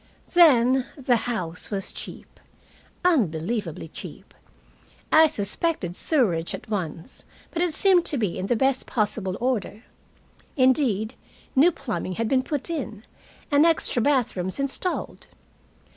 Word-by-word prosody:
Then, 265 Hz, -7 st, +5 dB
the 260 Hz, -3 st, +2 dB
house 180 Hz, -7 st, -3 dB
was 195 Hz, -2 st, -3 dB
cheap. -, -, -9 dB, 0.7 s
Unbelievably 190 Hz, -, 0 dB
cheap. -, -, -10 dB, 0.8 s
I 315 Hz, 0 st, +7 dB
suspected 205 Hz, -, -2 dB
sewerage 185 Hz, -, 0 dB
at -, -, -12 dB
once, 170 Hz, -5 st, -5 dB, 0.3 s
but 340 Hz, -, -2 dB
it 350 Hz, -3 st, 0 dB
seemed 375 Hz, -3 st, +4 dB
to 290 Hz, -, +1 dB
be 210 Hz, -7 st, -1 dB
in 190 Hz, -, -3 dB
the 240 Hz, -, +2 dB
best 265 Hz, +3 st, +1 dB
possible 205 Hz, -4 st, -1 dB
order. 235 Hz, -3 st, -2 dB, 0.7 s
Indeed, 255 Hz, -5 st, +2 dB, 0.4 s
new 305 Hz, +7 st, +6 dB
plumbing 230 Hz, -, -4 dB
had 225 Hz, +5 st, -2 dB
been 260 Hz, +2 st, +2 dB
put 285 Hz, +1 st, -3 dB
in, 260 Hz, -, -5 dB, 0.5 s
and 290 Hz, +1 st, +5 dB
extra 330 Hz, -7 st, +3 dB
bathrooms 225 Hz, -7 st, 0 dB
installed. 275 Hz, +6 st, -2 dB
245 Hz, 125 wpm, -24 LUFS, 200-290 Hz, 0.8 s, I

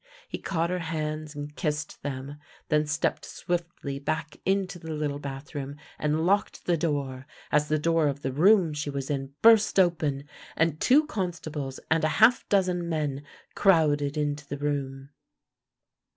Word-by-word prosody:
He -, -, -5 dB
caught 170 Hz, -2 st, -1 dB
her 180 Hz, -, -1 dB
hands 155 Hz, -2 st, -4 dB
and 145 Hz, 0 st, -7 dB
kissed 150 Hz, -3 st, -3 dB
them, 140 Hz, +1 st, -5 dB, 0.3 s
then 150 Hz, -1 st, +2 dB
stepped 150 Hz, +1 st, 0 dB
swiftly 170 Hz, -5 st, -4 dB
back 150 Hz, +2 st, -3 dB
into 190 Hz, -2 st, 0 dB
the 160 Hz, -1 st, -7 dB
little 150 Hz, -2 st, -2 dB
bathroom, 140 Hz, 0 st, -6 dB, 0.2 s
and 150 Hz, +2 st, 0 dB
locked 200 Hz, +3 st, +1 dB
the 175 Hz, -, +3 dB
door, 140 Hz, -4 st, -2 dB, 0.2 s
as 150 Hz, 0 st, +3 dB
the 155 Hz, +1 st, +2 dB
door 165 Hz, 0 st, +2 dB
of 140 Hz, 0 st, -3 dB
the 130 Hz, -, -1 dB
room 175 Hz, +3 st, +4 dB
she 150 Hz, 0 st, -3 dB
was 140 Hz, 0 st, -3 dB
in 135 Hz, -1 st, -4 dB
burst 220 Hz, -3 st, +6 dB
open, 155 Hz, -6 st, +2 dB, 0.3 s
and 165 Hz, -2 st, +1 dB
two 295 Hz, +5 st, +5 dB
constables 160 Hz, -, -4 dB
and 160 Hz, 0 st, +3 dB
a -, -, +4 dB
half 225 Hz, +3 st, +5 dB
dozen 180 Hz, -3 st, +1 dB
men 145 Hz, -4 st, -2 dB, 0.3 s
crowded 150 Hz, -6 st, +3 dB
into 145 Hz, -1 st, -2 dB
the 140 Hz, -, -4 dB
room. 140 Hz, -1 st, -3 dB
150 Hz, 155 wpm, -27 LUFS, 145-170 Hz, 0.3 s, burst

